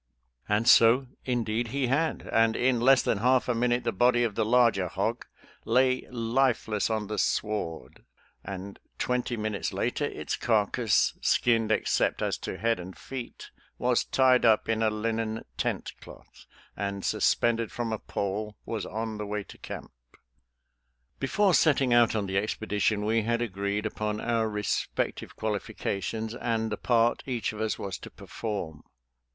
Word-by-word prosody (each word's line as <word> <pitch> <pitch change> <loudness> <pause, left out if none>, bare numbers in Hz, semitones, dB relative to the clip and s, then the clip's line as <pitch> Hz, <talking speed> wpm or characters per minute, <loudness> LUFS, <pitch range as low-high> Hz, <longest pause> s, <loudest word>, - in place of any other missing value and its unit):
And 105 +2 +1
so, 125 +1 +6 0.2
indeed, 120 -2 -1
he 135 +3 -1
had, 145 +6 0
and 115 0 +4
in 125 -1 +2
less 135 +2 +5
than 100 - 0
half 125 +3 +3
a 125 - +2
minute 120 +1 +1
the 115 - 0
body 120 +3 +3
of 115 -3 0
the 110 - 0
larger 115 -5 +3
hog - - -2 0.4
lay 130 +2 +2
lifeless 115 -3 0
on 110 -1 -1
the 105 0 -3
sward, 105 -8 -2 0.4
and 95 +1 -7 0.2
twenty 125 -1 -1
minutes 105 -2 -2
later - - -1
its - - -3
car 110 -3 +2
cass, 115 -4 +2
skinned 115 -2 +2
except 110 - +1
as - - -1
to - - -5
head 115 +3 +1
and 90 +1 -9
feet, 130 -3 -8 0.3
was 125 -1 +2
tied 130 -1 +3
up 110 -2 +4
in 115 0 0
a 110 - +3
linen 110 +1 -2
tent - - -2
cloth, - - -15 0.3
and, 100 0 -3
suspended 115 -1 +1
from 120 -4 -3
a 110 - -3
pole, 105 +1 -4
was 110 -3 -4
on 110 -1 -4
the 105 - -3
way 105 0 -3
to - - -14
camp. - - -8 1.3
Before 190 +8 +2
setting 140 -7 +4
out 120 -1 +4
on 105 -2 0
the 95 0 0
expedition 105 0 -1
we 115 +1 +2
had 115 +2 0
agreed 100 -1 -2
upon 105 0 -2
our 115 -1 0
respective 105 -1 -2
qualifications 110 +1 -3
and 115 -2 -2
the 105 - -2
part 120 -1 +2
each 120 -4 -2
of 105 - -6
us 110 -1 -1
was 95 -2 -5
to - - -10
perform. 95 -9 -6
115 Hz, 160 wpm, -28 LUFS, 105-120 Hz, 1.3 s, so